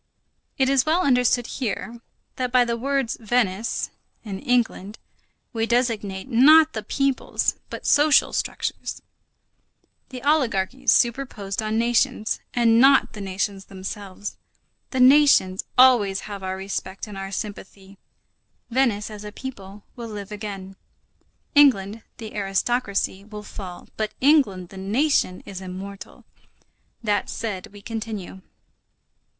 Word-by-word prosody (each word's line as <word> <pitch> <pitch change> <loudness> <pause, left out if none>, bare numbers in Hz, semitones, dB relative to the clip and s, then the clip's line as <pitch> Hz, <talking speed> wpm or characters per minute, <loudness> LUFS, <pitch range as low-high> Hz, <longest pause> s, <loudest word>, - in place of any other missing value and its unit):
It 265 - +3
is 270 -2 +3
well 330 +4 +3
understood 250 -2 +3
here, 235 -1 -4 0.4
that 250 -1 -2
by 250 -1 +5
the 235 -1 -1
words 270 0 -1
Venice, 225 -2 0 0.3
England, 220 -1 -1 0.6
we 225 -1 -1
designate 230 -5 -1
not 305 +6 +6
the 215 - -3
peoples, 275 +5 0 0.2
but - - -8
social 295 -1 +4
structures; - - -3 1.1
the 255 -1 -8
oligarchies 265 -6 +1
superposed 230 -5 0
on 215 0 -1
nations, 230 -2 +1 0.2
and 230 -1 +4
not 270 +1 +5
the 210 - -7
nations 195 0 -3
themselves. 195 +1 -7 0.5
The 260 - -3
nations 255 -8 +5
always 235 -7 +5
have 205 -2 -7
our 190 0 -4
respect 190 0 -5
and 210 -2 -10
our 195 0 -6
sympathy. 200 -1 -7 0.7
Venice, 230 -5 +1
as 210 -1 -8
a 210 - -7
people, 205 -5 -9
will 235 -2 -7
live 205 -1 -7
again; 195 -2 -7 0.8
England, 230 -8 +4 0.2
the 220 -2 -8
aristocracy, 200 0 -1
will 210 0 -9
fall, 185 -4 -9
but 215 -1 -3
England, 255 - +3
the 195 - -12
nation, 205 -1 +1
is 190 -1 -8
immortal. 190 +1 -9 0.8
That 210 -2 0
said, 205 -5 -4
we 205 0 -15
continue. 215 -4 -6
215 Hz, 120 wpm, -23 LUFS, 195-250 Hz, 1.1 s, not